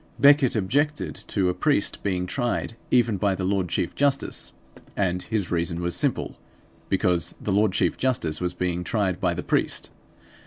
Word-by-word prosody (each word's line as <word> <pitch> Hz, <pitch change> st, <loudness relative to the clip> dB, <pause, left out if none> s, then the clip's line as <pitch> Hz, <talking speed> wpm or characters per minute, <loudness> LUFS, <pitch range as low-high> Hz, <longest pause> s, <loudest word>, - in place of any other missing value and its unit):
Becket 140 Hz, -3 st, +6 dB
objected 145 Hz, +9 st, 0 dB
to 95 Hz, -3 st, +1 dB
a -, -, +1 dB
priest 100 Hz, +3 st, +1 dB
being 90 Hz, -3 st, -1 dB
tried 120 Hz, +2 st, -2 dB
even 120 Hz, -4 st, +3 dB
by 95 Hz, 0 st, +1 dB
the 95 Hz, -, -4 dB
Lord 95 Hz, -1 st, 0 dB
Chief 85 Hz, -, -1 dB
Justice. 140 Hz, -1 st, 0 dB, 0.5 s
And 90 Hz, -2 st, 0 dB
his 100 Hz, 0 st, -2 dB
reason 85 Hz, 0 st, 0 dB
was 85 Hz, 0 st, -1 dB
simple: -, -, -1 dB, 0.5 s
because 90 Hz, -2 st, +1 dB
the 105 Hz, -, -3 dB
Lord 105 Hz, +1 st, +3 dB
Chief 90 Hz, -, +1 dB
Justice 90 Hz, -12 st, 0 dB
was 90 Hz, 0 st, -1 dB
being 90 Hz, -1 st, -1 dB
tried 95 Hz, -2 st, -1 dB
by 90 Hz, -2 st, +1 dB
the 90 Hz, -, -4 dB
priest. -, -, -1 dB
95 Hz, 165 wpm, -25 LUFS, 90-115 Hz, 0.5 s, Becket